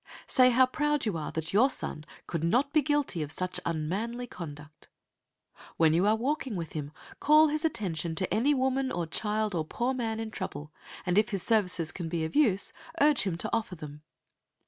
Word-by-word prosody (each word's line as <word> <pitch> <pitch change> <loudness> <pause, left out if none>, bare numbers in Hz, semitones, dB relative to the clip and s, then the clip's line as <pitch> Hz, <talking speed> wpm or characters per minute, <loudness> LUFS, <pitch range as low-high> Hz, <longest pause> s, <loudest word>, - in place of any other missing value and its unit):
Say 255 -1 +5
how 255 +1 +5
proud 295 +2 0
you 210 -5 -1
are 155 -2 -4
that 160 +2 -3
your 240 +7 +5
son 155 - -5 0.2
could 165 -2 -3
not 250 - +2
be 305 - +5
guilty 290 - 0
of 145 -1 -4
such 185 +4 -2
unmanly 195 +10 -2
conduct. 155 -7 -10 0.9
When 160 -1 +4
you 180 +5 +3
are 215 - +4
walking 260 0 -2
with 165 -3 -4
him, 145 -2 -5 0.3
call 305 +1 +6
his 305 +2 -2
attention 175 - -2
to 185 +3 -1
any 275 +7 +3
woman 265 0 0
or 175 -1 -2
child 210 +4 -1
or 165 -3 0
poor 240 +11 -2
man 225 -3 -2
in 225 -1 -4
trouble, 150 -6 -6 0.3
and 180 +2 +3
if 215 +2 +1
his 195 -6 -3
services 180 -7 +2
can 175 -2 -5
be 165 -1 -1
of 160 - -6
use, 220 -10 +3 0.3
urge 290 -5 +4
him 170 -3 -1
to - - -3
offer 220 -5 -1
them. 150 -2 -9
210 Hz, 195 wpm, -29 LUFS, 165-255 Hz, 0.9 s, call